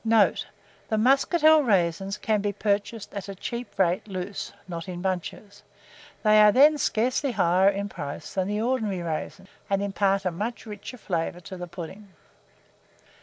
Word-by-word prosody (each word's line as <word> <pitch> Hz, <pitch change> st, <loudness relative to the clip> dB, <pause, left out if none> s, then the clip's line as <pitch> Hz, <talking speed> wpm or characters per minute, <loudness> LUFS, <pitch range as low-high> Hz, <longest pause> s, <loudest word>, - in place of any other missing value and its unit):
Note. 225 Hz, -2 st, +3 dB, 0.4 s
The 220 Hz, -, +1 dB
muscatel 300 Hz, +6 st, +5 dB
raisins 195 Hz, -, +1 dB
can 215 Hz, -2 st, 0 dB
be 205 Hz, 0 st, 0 dB
purchased 205 Hz, +1 st, -2 dB
at 200 Hz, -1 st, -6 dB
a 195 Hz, -, -6 dB
cheap 235 Hz, +1 st, -6 dB
rate 190 Hz, +3 st, +1 dB
loose 190 Hz, 0 st, -5 dB, 0.2 s
(not 170 Hz, 0 st, -6 dB
in 175 Hz, -1 st, -5 dB
bunches): 190 Hz, +2 st, -4 dB, 0.6 s
they 215 Hz, -1 st, +6 dB
are 210 Hz, 0 st, +7 dB
then 295 Hz, +5 st, +6 dB
scarcely 255 Hz, +3 st, 0 dB
higher 185 Hz, -1 st, +4 dB
in 200 Hz, 0 st, -2 dB
price 145 Hz, -7 st, -7 dB
than 190 Hz, -1 st, 0 dB
the 210 Hz, +1 st, -1 dB
ordinary 220 Hz, -7 st, -1 dB
raisins, 170 Hz, +4 st, -5 dB, 0.2 s
and 195 Hz, 0 st, +1 dB
impart 195 Hz, -1 st, +1 dB
a 185 Hz, -, +1 dB
much 215 Hz, +8 st, -4 dB
richer 210 Hz, +3 st, -8 dB
flavour 175 Hz, -4 st, -3 dB
to 185 Hz, -, -9 dB
the 180 Hz, -1 st, -6 dB
pudding. 180 Hz, +4 st, -9 dB
200 Hz, 160 wpm, -26 LUFS, 185-220 Hz, 0.6 s, are